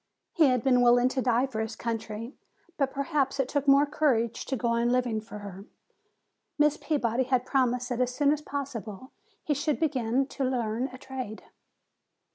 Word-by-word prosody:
He 325 - +5
had 250 -3 +1
been 250 -2 +4
willing 245 +1 +5
to 260 0 -1
die 245 0 +2
for 250 -5 -5
his 220 0 -3
country, 230 +1 -4 0.4
but 275 -2 0
perhaps 280 -1 -1
it 270 - +1
took 285 +1 -2
more 275 +1 +6
courage 265 -6 0
to 270 - -1
go 235 -1 -1
on 235 +1 +1
living 245 -3 +1
for 215 -1 -10
her. 200 -1 -9 0.9
Miss 300 0 +4
Peabody 260 -6 0
had 255 -1 +1
promised 250 -2 +1
that 245 0 -1
as 250 0 +1
soon 290 0 +3
as 300 - -4
possible 260 -5 -6 0.3
he 300 - 0
should 290 +1 -1
begin 265 -4 +1
to 275 - -5
learn 245 -1 -1
a 255 -1 -11
trade. 255 -5 -7
255 Hz, 180 wpm, -28 LUFS, 235-275 Hz, 0.9 s, more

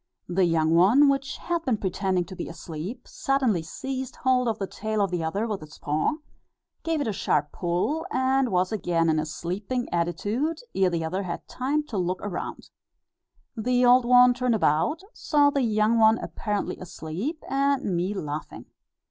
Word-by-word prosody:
The 180 +1 +2
young 160 -1 +2
one, 220 +12 +6
which 275 0 -1
had 340 -1 -2
been 250 -7 +1
pretending 190 -2 -1
to 185 - -9
be - - -5
asleep, 170 +8 -7
suddenly 260 -10 0
seized 260 +9 -5
hold 255 -1 +2
of 225 -2 0
the 195 - -2
tail 215 +2 -3
of 200 -3 +1
the 175 -2 -1
other 195 +8 -1
with 210 -5 -3
its 155 0 -12
paw, 150 - 0 0.7
gave 325 -2 -1
it 285 - -1
a 215 - -1
sharp 150 -5 0
pull, 185 - -1
and 260 0 +1
was 185 0 +1
again 170 -6 +1
in 155 - +1
a 155 - -2
sleeping 195 +10 -3
attitude 205 - -1 0.2
ere 190 -1 +3
the 165 -2 -2
other 185 +5 -2
had 180 -3 -5
time 285 +4 -1
to 225 -9 -4
look 180 +1 -1
round. 200 -3 -5 0.8
The 250 +2 +2
old 245 0 +6
one 250 0 +7
turned 250 -1 +1
about, 220 - +1
saw 290 -2 +3
the 280 - 0
young 220 -1 +2
one 220 0 +6
apparently 210 -4 -3
asleep, 185 - -5
and 275 0 +1
me 180 +4 -1
laughing. 150 -4 -5
210 Hz, 175 wpm, -26 LUFS, 175-255 Hz, 0.8 s, one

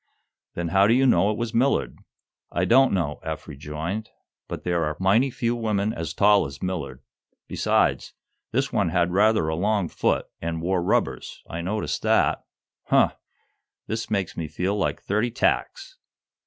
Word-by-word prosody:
"Then 85 -1 -2
how 95 +3 +4
do 115 - +4
you 135 +1 +3
know 105 -5 +4
it 105 - -1
was 115 0 -3
Millard?" 130 +4 +1 0.5
"I 85 - 0
don't 130 +6 +5
know," 80 -6 -1
Eph 80 -1 -6
rejoined. 80 +9 -5 0.4
"But - - -6
there 85 -1 0
are 75 -1 -2
mighty 105 +8 +3
few 120 -1 -1
women 110 -2 -1
as 80 0 -5
tall 100 -3 +4
as 70 0 -10
Millard. 90 -6 -4 0.4
Besides, - - +1 0.4
this - - -1
one - - +1
had 85 +1 +1
rather 105 -2 +3
a 80 - -1
long 100 +1 0
foot, - - 0 0.2
and 80 0 -3
wore 90 +2 0
rubbers. 85 - -1
I 85 - -5
noticed 105 +5 -2
that. - - +2 0.4
Huh! - - +4 0.7
This 110 +1 -4
makes 100 -4 -1
me 80 - -4
feel 90 +6 -2
like 100 - -2
thirty 105 +4 0
tacks!" - - -1
95 Hz, 165 wpm, -24 LUFS, 85-110 Hz, 0.7 s, don't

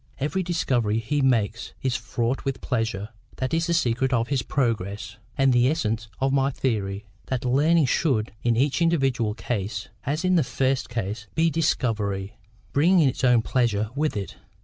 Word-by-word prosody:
Every 150 +7 -1
discovery 125 - 0
he 115 +6 -1
makes 115 -4 +1
is 130 -2 +1
fraught 115 +3 -2
with 135 -1 -2
pleasure—that 110 +3 -3
is 165 +1 +1
the 170 - +1
secret 130 -3 +1
of 115 -2 +1
his 140 -3 +1
progress, 105 -4 -2 0.2
and 135 -1 +4
the 120 +1 +4
essence 115 -7 -1
of 135 0 +1
my 135 0 +3
theory: 105 -7 -2 0.2
that 130 0 -2
learning 150 +5 +4
should, 125 - +1
in 120 -1 +2
each 140 +4 +1
individual 135 -10 +1
case, 100 -4 -3
as 155 +6 -1
in 185 0 +4
the 160 - +4
first 130 +1 0
case, 110 -3 -4
be 165 +1 +3
DISCOVERY—bringing 115 - 0
its 130 - -2
own 125 -3 +5
pleasure 110 -4 0
with 150 -3 -1
it. 100 - -5
125 Hz, 160 wpm, -25 LUFS, 110-140 Hz, 0.2 s, own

